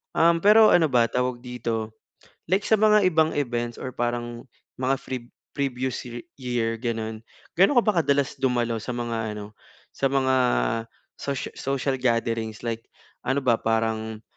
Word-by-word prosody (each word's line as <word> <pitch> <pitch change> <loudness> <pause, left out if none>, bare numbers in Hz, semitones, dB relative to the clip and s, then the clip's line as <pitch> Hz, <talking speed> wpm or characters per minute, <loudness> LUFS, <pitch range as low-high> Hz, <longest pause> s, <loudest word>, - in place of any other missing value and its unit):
Um, 170 0 +5
pero 215 +3 +7
ano 165 -2 +5
ba, 120 -3 +3
tawag 125 -1 -1
dito, 115 -3 -4 0.5
like 190 +3 +2
sa 220 - +3
mga 210 -1 +5
ibang 160 -1 +2
events 120 -4 -2
or 130 - -4
parang 120 +1 -3 0.3
mga 135 +1 +2
pre 130 - -3 0.4
previous 130 -3 -2
ye 120 0 -7 0.2
year 115 -3 -1
ganun, 110 -2 -3 0.4
gaano 195 +8 +5
ka 240 - +7
ba 215 - +3
kadalas 140 -3 +1
dumalo 120 -3 +1
sa 120 +3 -5
mga 115 -3 -3
ano, 105 0 -8 0.4
sa 135 - -1
mga 130 -1 +2 0.9
socia 140 -2 -3
social 135 0 -1
gatherings, 115 -3 -1
like 115 -1 -3 0.4
ano 135 +2 +1
ba, 115 -2 +3
parang 110 -1 -1
125 Hz, 150 wpm, -25 LUFS, 115-140 Hz, 0.9 s, pero